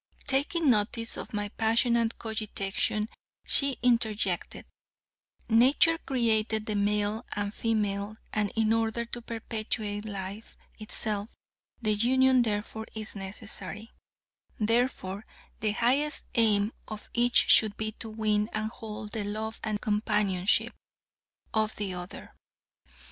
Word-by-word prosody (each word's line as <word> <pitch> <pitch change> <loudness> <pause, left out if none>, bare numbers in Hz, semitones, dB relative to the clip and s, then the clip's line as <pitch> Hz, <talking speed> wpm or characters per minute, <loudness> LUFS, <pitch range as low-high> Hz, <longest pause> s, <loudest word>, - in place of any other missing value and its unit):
Taking 285 +2 +2
notice 230 +1 +1
of - - -6
my 205 -1 -2
passionate 230 +1 +1
cogitation, 215 -1 -1 0.4
she 275 -3 +4
interjected, 220 -6 0 0.8
"Nature 265 +8 +5
created 220 -4 +1
the 215 - -2
male 205 +1 0
and 205 0 -2
female, 210 -2 -1 0.2
and 210 -2 0
in 220 0 +3
order 225 +1 0
to 240 +1 -6
perpetuate 215 -2 -4
life 200 +2 -7 0.2
itself, 215 0 -1 0.5
the 215 -3 +1
union 260 +4 +4
thereof 220 0 -2
is 215 -1 -3
necessary; 205 +2 -6 0.7
therefore, 220 -3 0 0.4
the 215 -1 0
highest 270 +7 +1
aim 215 -2 +3
of 215 -1 -8
each 240 +1 +4
should 215 -2 +5
be 215 0 -2
to 225 +1 -7
win 215 -1 0
and 215 +1 -2
hold 215 -2 -7
the 215 -1 -3
love 215 +2 -4
and 215 -2 -2
companionship 210 -3 +1 0.8
of 215 -1 +1
the 200 -3 -2
other. 180 0 -8
215 Hz, 115 wpm, -29 LUFS, 210-230 Hz, 0.8 s, Nature